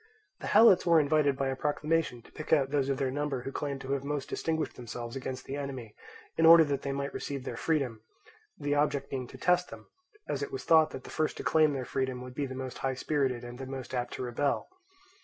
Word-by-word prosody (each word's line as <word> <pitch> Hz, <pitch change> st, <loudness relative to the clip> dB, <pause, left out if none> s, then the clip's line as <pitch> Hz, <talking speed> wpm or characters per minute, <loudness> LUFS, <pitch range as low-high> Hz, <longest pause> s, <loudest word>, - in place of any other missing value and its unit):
The -, -, -6 dB
Helots 220 Hz, -4 st, +7 dB
were 170 Hz, -2 st, +5 dB
invited 145 Hz, -2 st, +2 dB
by 135 Hz, -1 st, 0 dB
a 135 Hz, -, -1 dB
proclamation 150 Hz, -3 st, -1 dB
to -, -, -18 dB
pick 155 Hz, -, -8 dB
out 140 Hz, -4 st, +4 dB
those 140 Hz, -2 st, +1 dB
of 135 Hz, -, 0 dB
their 130 Hz, -1 st, 0 dB
number 140 Hz, -2 st, -2 dB
who 135 Hz, -, -4 dB
claimed 140 Hz, -1 st, -3 dB
to 135 Hz, -, -5 dB
have 140 Hz, -1 st, 0 dB
most 145 Hz, -1 st, -3 dB
distinguished 160 Hz, -1 st, -2 dB
themselves 120 Hz, 0 st, -7 dB
against 130 Hz, -1 st, -5 dB
the 135 Hz, -, -4 dB
enemy, 130 Hz, -6 st, -5 dB, 0.4 s
in 165 Hz, -, +5 dB
order 165 Hz, 0 st, +10 dB
that 140 Hz, -2 st, -1 dB
they 140 Hz, -, -3 dB
might 140 Hz, 0 st, -3 dB
receive 140 Hz, -2 st, -4 dB
their 120 Hz, -, -5 dB
freedom; 130 Hz, -5 st, -1 dB, 0.6 s
the 145 Hz, 0 st, -1 dB
object 145 Hz, -1 st, 0 dB
being 130 Hz, -2 st, -3 dB
to -, -, -11 dB
test 180 Hz, 0 st, +2 dB
them, -, -, -10 dB, 0.4 s
as -, -, -2 dB
it 425 Hz, -1 st, -3 dB
was 400 Hz, -, -5 dB
thought 160 Hz, -1 st, +5 dB
that 130 Hz, -, -8 dB
the -, -, -10 dB
first 155 Hz, -1 st, -1 dB
to -, -, -5 dB
claim 155 Hz, -2 st, +4 dB
their 130 Hz, -2 st, -3 dB
freedom 130 Hz, -1 st, -2 dB
would 125 Hz, 0 st, -9 dB
be 140 Hz, +1 st, -2 dB
the 130 Hz, -, -7 dB
most 130 Hz, -1 st, -6 dB
high 135 Hz, -1 st, -1 dB
spirited 135 Hz, -3 st, 0 dB
and 120 Hz, +1 st, -8 dB
the 135 Hz, -, -6 dB
most 130 Hz, -1 st, -7 dB
apt 125 Hz, -1 st, -2 dB
to -, -, -4 dB
rebel. 125 Hz, +3 st, -1 dB
140 Hz, 240 wpm, -30 LUFS, 130-150 Hz, 0.6 s, order